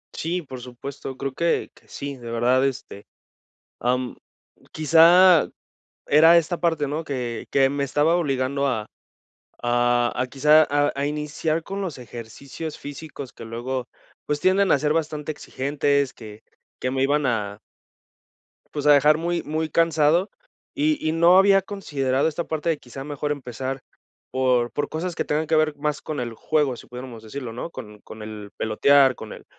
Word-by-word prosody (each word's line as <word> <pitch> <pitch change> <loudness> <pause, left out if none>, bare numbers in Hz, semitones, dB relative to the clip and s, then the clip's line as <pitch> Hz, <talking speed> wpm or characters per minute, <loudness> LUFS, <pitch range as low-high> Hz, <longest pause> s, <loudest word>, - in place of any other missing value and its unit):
Sí, 175 +2 -2
por 130 -3 -9
supuesto, 130 +2 -8
creo 135 0 -4
que 170 +4 0
que - - -24
sí, 140 0 -6
de 120 -2 -9
verdad, 120 +3 +2
este, 115 -6 -7 0.7
am, 125 0 -1 0.6
quizá 165 +3 +6 0.6
era 160 +3 +7
esta 170 +1 0
parte, 165 -4 +1
¿no?, 150 +4 -3
que 125 -6 -4
que 135 -1 +4
me 140 0 -1
estaba 150 +4 +2
obligando 140 -4 0
a 110 -5 -2 0.7
a 120 0 +2
a 125 - -1
quizá 150 +4 +5
a 145 0 +2
a 140 +1 -1
iniciar 150 +2 -2
con 195 +1 -5
los 175 -8 -4
ejercicios 125 +6 -8
físicos 145 -2 -8
que - - -11
luego, 120 +2 -4 0.4
pues, 150 - -1
tienden 190 +3 +3
a - - +5
ser 150 +2 +1
bastante 155 -1 -2
exigentes, 140 -1 -1
que 110 -1 -12 0.3
que 130 - -2
me 135 0 0
iban 145 +1 +2
a 105 -4 -2 1.2
pues, 150 -1 -2
a 150 - +8
dejar 150 +2 +5
muy 170 +1 -1
muy 155 +1 -2
cansado. 165 +3 +2 0.4
Y 305 +1 +1
y - - +2
no 170 +3 +5
había 195 0 +6
considerado 145 -9 -1
esta 160 +2 -3
parte 160 +1 -2
de 160 - +1
quizá, 130 +2 -9
mejor 145 0 -3
empezar 130 -1 -4 0.5
por 125 -2 +1
por 145 - -2
cosas 175 +3 -3
que - - -1
tengan 150 +2 0
que 160 - +1
ver 155 -1 +2
más 150 0 -2
con 155 -2 -5
el 120 -2 -4
juego, 145 +2 0
si - - -13
pudiéramos 125 -2 -9
decirlo, 120 +1 -7
¿no?, 125 +8 -5
con 105 -9 -10
con 110 0 -10
el 105 -1 -8
pelotear, 135 +5 +4
con 110 - -9
el - - -13
140 Hz, 170 wpm, -23 LUFS, 125-155 Hz, 1.2 s, a